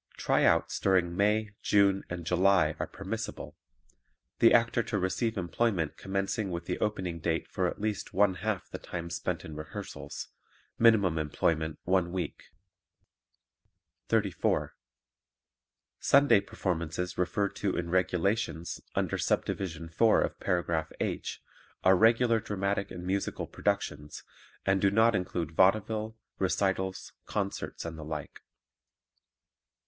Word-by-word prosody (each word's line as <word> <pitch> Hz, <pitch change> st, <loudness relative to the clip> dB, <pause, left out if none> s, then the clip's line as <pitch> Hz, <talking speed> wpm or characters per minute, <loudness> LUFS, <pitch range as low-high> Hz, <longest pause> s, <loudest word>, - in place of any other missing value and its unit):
"Tryouts" -, -, +2 dB
during 90 Hz, -3 st, +2 dB
May, 105 Hz, +2 st, +2 dB
June 100 Hz, -1 st, +3 dB
and 90 Hz, -1 st, -5 dB
July 90 Hz, -2 st, +3 dB
are -, -, -2 dB
permissible; -, -, -6 dB, 0.8 s
the 115 Hz, -, +7 dB
actor 115 Hz, 0 st, +4 dB
to 110 Hz, -1 st, -2 dB
receive 105 Hz, +4 st, -1 dB
employment 90 Hz, -2 st, 0 dB
commencing 95 Hz, +2 st, -2 dB
with 85 Hz, -1 st, -4 dB
the -, -, -3 dB
opening 95 Hz, -5 st, -2 dB
date 80 Hz, 0 st, -1 dB
for -, -, -1 dB
at -, -, -5 dB
least 105 Hz, -1 st, -2 dB
one 100 Hz, 0 st, +3 dB
half 100 Hz, 0 st, -3 dB
the -, -, -7 dB
time 85 Hz, -1 st, -6 dB
spent -, -, -3 dB
in 80 Hz, -, -8 dB
rehearsals; 75 Hz, 0 st, -7 dB, 0.5 s
minimum 100 Hz, -8 st, +5 dB
employment 80 Hz, +1 st, 0 dB
one 90 Hz, -1 st, +1 dB
week. 90 Hz, -5 st, -4 dB, 1.6 s
34. 105 Hz, -5 st, +1 dB, 1.3 s
Sunday 140 Hz, -6 st, +5 dB
performances 90 Hz, -2 st, -3 dB
referred 100 Hz, +2 st, 0 dB
to 100 Hz, -3 st, -1 dB
in 85 Hz, -1 st, -3 dB
"Regulations," 90 Hz, -1 st, 0 dB
under -, -, 0 dB
Subdivision 85 Hz, -4 st, -1 dB
4 110 Hz, +7 st, +4 dB
of -, -, -2 dB
Paragraph 85 Hz, -3 st, -1 dB
H, -, -, -3 dB, 0.4 s
are 95 Hz, +1 st, +6 dB
regular 115 Hz, +3 st, +4 dB
dramatic 100 Hz, -2 st, -2 dB
and 90 Hz, -, -7 dB
musical 95 Hz, +2 st, -1 dB
productions 75 Hz, +1 st, -3 dB, 0.4 s
and 95 Hz, 0 st, +2 dB
do 100 Hz, -, +5 dB
not 110 Hz, +3 st, +4 dB
include 90 Hz, -4 st, -2 dB
vaudeville, 110 Hz, +5 st, +2 dB, 0.2 s
recitals, 95 Hz, +1 st, -1 dB
concerts 100 Hz, -4 st, -3 dB
and 80 Hz, -1 st, -6 dB
the -, -, -6 dB
like. 75 Hz, -1 st, -6 dB
95 Hz, 125 wpm, -30 LUFS, 85-105 Hz, 1.6 s, the